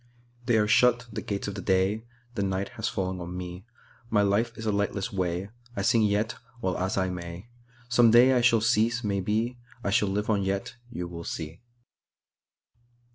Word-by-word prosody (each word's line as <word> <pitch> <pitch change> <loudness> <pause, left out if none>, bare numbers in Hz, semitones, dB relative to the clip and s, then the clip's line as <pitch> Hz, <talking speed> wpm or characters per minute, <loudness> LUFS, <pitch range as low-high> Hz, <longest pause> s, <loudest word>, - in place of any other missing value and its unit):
They 120 -3 +4
are 105 -1 +3
shut, 120 +2 +4
the 110 - -3
gates 100 -1 -3
of 100 - -3
the 100 - -5
day; 95 +4 +1 0.3
The 110 - -2
night 95 0 -1
has - - -3
fallen 95 -1 -2
on 90 +1 -6
me:My 105 +4 -4
life 105 +4 +2
is 110 - -6
a 110 - +2
lightless 100 -1 -1
way;I 100 +5 -3
sing 115 +1 +4
yet, 105 +1 +1 0.2
while 95 -5 -1
as 95 +1 -1
I 95 -1 +1
may! 90 +4 -7 0.4
Some 120 -1 +5
day 120 +3 +7
I 125 - +3
shall 115 -2 +4
cease, 115 +1 +2
maybe:I 110 +3 -2
shall 105 -2 +3
live 105 +2 -1
on 105 -3 +2
yet, 95 0 -2
you 90 -7 -5
will 85 -1 -7
see. 80 +1 -6
105 Hz, 175 wpm, -27 LUFS, 95-115 Hz, 0.4 s, day